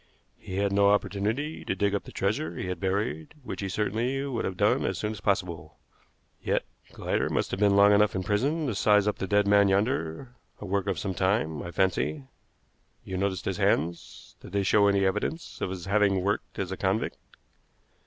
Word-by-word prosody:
He 95 Hz, -, -7 dB
had 100 Hz, 0 st, +1 dB
no 100 Hz, 0 st, +4 dB
opportunity 105 Hz, -, -1 dB
to -, -, -2 dB
dig 100 Hz, +1 st, +1 dB
up 100 Hz, -, -2 dB
the -, -, -10 dB
treasure 95 Hz, -4 st, -1 dB
he -, -, -4 dB
had 90 Hz, -2 st, -4 dB
buried, 95 Hz, -, -2 dB
which -, -, -6 dB
he 100 Hz, -, -3 dB
certainly 120 Hz, +7 st, -1 dB
would 130 Hz, -4 st, -2 dB
have 95 Hz, -1 st, -4 dB
done -, -, +2 dB
as -, -, -1 dB
soon 105 Hz, -, -2 dB
as 105 Hz, -4 st, -8 dB
possible. 85 Hz, -6 st, -2 dB, 0.6 s
Yet -, -, 0 dB, 0.3 s
Glider -, -, -1 dB
must -, -, -1 dB
have 95 Hz, -, -3 dB
been 100 Hz, -1 st, +4 dB
long 100 Hz, +1 st, +6 dB
enough 105 Hz, 0 st, +3 dB
in 95 Hz, -, -1 dB
prison 135 Hz, -, 0 dB
to 125 Hz, -, -1 dB
size 105 Hz, 0 st, +3 dB
up 105 Hz, -, -1 dB
the 95 Hz, -, -2 dB
dead 105 Hz, +1 st, +3 dB
man 100 Hz, 0 st, +5 dB
yonder 100 Hz, +1 st, -1 dB, 0.3 s
a -, -, -7 dB
work 100 Hz, 0 st, -1 dB
of 100 Hz, -, 0 dB
some 95 Hz, -2 st, -3 dB
time, 95 Hz, -5 st, 0 dB
I -, -, -6 dB
fancy. 85 Hz, -5 st, 0 dB, 0.8 s
You 95 Hz, -, -6 dB
noticed 95 Hz, -1 st, -1 dB
his -, -, -2 dB
hands. 85 Hz, +3 st, -1 dB
Did -, -, -12 dB
they 100 Hz, -1 st, +1 dB
show 100 Hz, +1 st, +4 dB
any 100 Hz, -1 st, +3 dB
evidence 105 Hz, -, -2 dB
of -, -, -1 dB
his 90 Hz, -2 st, -6 dB
having 100 Hz, -2 st, +2 dB
worked 100 Hz, +1 st, -2 dB
as 95 Hz, -1 st, -3 dB
a 95 Hz, -, -4 dB
convict? 95 Hz, +3 st, -1 dB
100 Hz, 205 wpm, -27 LUFS, 95-105 Hz, 0.8 s, long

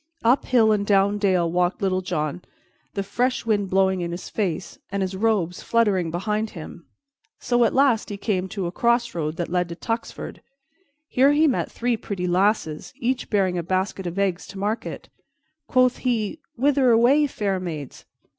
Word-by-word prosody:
Up 240 Hz, +4 st, +3 dB
hill 225 Hz, -4 st, +4 dB
and 210 Hz, -1 st, +2 dB
down 200 Hz, 0 st, +2 dB
dale 185 Hz, -5 st, +2 dB
walked 180 Hz, +1 st, +1 dB
Little 185 Hz, -1 st, 0 dB
John, 155 Hz, -2 st, -2 dB, 0.5 s
the 200 Hz, -, -1 dB
fresh 245 Hz, +5 st, -1 dB
wind 205 Hz, -3 st, +1 dB
blowing 190 Hz, -1 st, +2 dB
in 170 Hz, 0 st, -3 dB
his 175 Hz, +1 st, -6 dB
face 185 Hz, -5 st, -3 dB
and 200 Hz, 0 st, -1 dB
his 190 Hz, 0 st, -3 dB
robes 190 Hz, -4 st, 0 dB
fluttering 205 Hz, -7 st, +1 dB
behind 210 Hz, +6 st, -1 dB
him, 160 Hz, -, -7 dB
and 170 Hz, -, -14 dB, 0.6 s
so 240 Hz, -1 st, +2 dB
at -, -, +1 dB
last 260 Hz, -5 st, +3 dB
he 205 Hz, -, -5 dB
came 190 Hz, -3 st, -1 dB
to 195 Hz, -2 st, -3 dB
a 170 Hz, -, -2 dB
crossroad 230 Hz, -9 st, 0 dB
that 170 Hz, 0 st, -3 dB
led 180 Hz, -1 st, 0 dB
to 170 Hz, -, -6 dB
Tuxford. 225 Hz, +6 st, -5 dB, 0.7 s
Here 275 Hz, +2 st, +4 dB
he 305 Hz, +2 st, +4 dB
met 265 Hz, -, 0 dB
three 240 Hz, -1 st, -1 dB
pretty 200 Hz, -5 st, -4 dB
lasses, 180 Hz, -3 st, 0 dB
each 255 Hz, -1 st, -2 dB
bearing 190 Hz, -4 st, +1 dB
a -, -, 0 dB
basket 185 Hz, +2 st, -2 dB
of 175 Hz, +2 st, -5 dB
eggs 195 Hz, -3 st, 0 dB
to 195 Hz, -, -10 dB
market. 210 Hz, +4 st, -3 dB, 0.6 s
Quoth 255 Hz, -1 st, +3 dB
he, 240 Hz, +2 st, -1 dB, 0.2 s
"Whither 270 Hz, 0 st, +3 dB
away, 250 Hz, +6 st, +5 dB
fair 200 Hz, -7 st, -2 dB
maids?" 155 Hz, -7 st, -7 dB
200 Hz, 175 wpm, -23 LUFS, 180-230 Hz, 0.7 s, away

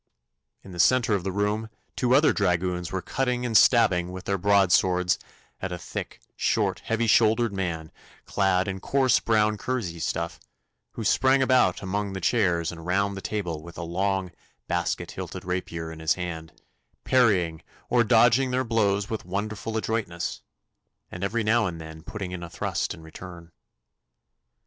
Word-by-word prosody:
In 95 Hz, -, -12 dB
the 90 Hz, -, -9 dB
centre 120 Hz, +3 st, +4 dB
of 100 Hz, -3 st, 0 dB
the 95 Hz, -, -2 dB
room 105 Hz, +3 st, -1 dB, 0.3 s
two 125 Hz, 0 st, +2 dB
other 150 Hz, +3 st, +5 dB
dragoons 90 Hz, -2 st, 0 dB
were 95 Hz, -1 st, -3 dB
cutting 125 Hz, -2 st, -1 dB
and 115 Hz, -2 st, -2 dB
stabbing 90 Hz, -8 st, +5 dB
with 95 Hz, 0 st, -7 dB
their 100 Hz, -1 st, -1 dB
broad 100 Hz, -1 st, +3 dB
swords 90 Hz, -1 st, +3 dB, 0.4 s
at 95 Hz, -, -3 dB
a 90 Hz, -, -3 dB
thick, -, -, -7 dB, 0.2 s
short, -, -, 0 dB
heavy 115 Hz, +1 st, -1 dB
shouldered 115 Hz, 0 st, +3 dB
man, 85 Hz, -5 st, -3 dB, 0.3 s
clad 95 Hz, -1 st, +1 dB
in 95 Hz, -1 st, -3 dB
coarse 135 Hz, +5 st, +2 dB
brown 110 Hz, -1 st, +2 dB
kersey 105 Hz, -11 st, -3 dB
stuff, -, -, -3 dB, 0.5 s
who -, -, -5 dB
sprang 130 Hz, 0 st, +3 dB
about 125 Hz, -9 st, +3 dB
among 100 Hz, +1 st, -2 dB
the 95 Hz, -, -4 dB
chairs 90 Hz, -7 st, +1 dB
and 85 Hz, 0 st, -10 dB
round 100 Hz, +2 st, +1 dB
the 95 Hz, -, -6 dB
table 90 Hz, -8 st, -3 dB
with 85 Hz, +1 st, -12 dB
a 85 Hz, -, -4 dB
long 95 Hz, +2 st, -1 dB, 0.4 s
basket 85 Hz, 0 st, -2 dB
hilted -, -, -7 dB
rapier 85 Hz, -3 st, -3 dB
in 80 Hz, -, -9 dB
his 80 Hz, 0 st, +1 dB
hand, 80 Hz, -3 st, -5 dB, 0.5 s
parrying 95 Hz, -11 st, +2 dB, 0.3 s
or 120 Hz, -1 st, +3 dB
dodging 120 Hz, +3 st, +4 dB
their 130 Hz, +1 st, 0 dB
blows 105 Hz, -4 st, +1 dB
with 110 Hz, -1 st, -4 dB
wonderful 105 Hz, +4 st, -3 dB
adroitness, 110 Hz, -7 st, -3 dB, 0.7 s
and 90 Hz, -, -6 dB
every 110 Hz, +4 st, 0 dB
now 110 Hz, 0 st, +3 dB
and 85 Hz, -2 st, -5 dB
then 80 Hz, 0 st, -9 dB
putting 95 Hz, +1 st, -6 dB
in 90 Hz, -1 st, -5 dB
a 85 Hz, -, -7 dB
thrust -, -, -2 dB
in 80 Hz, -, -14 dB
return. 85 Hz, +1 st, -11 dB
95 Hz, 165 wpm, -26 LUFS, 90-110 Hz, 0.7 s, other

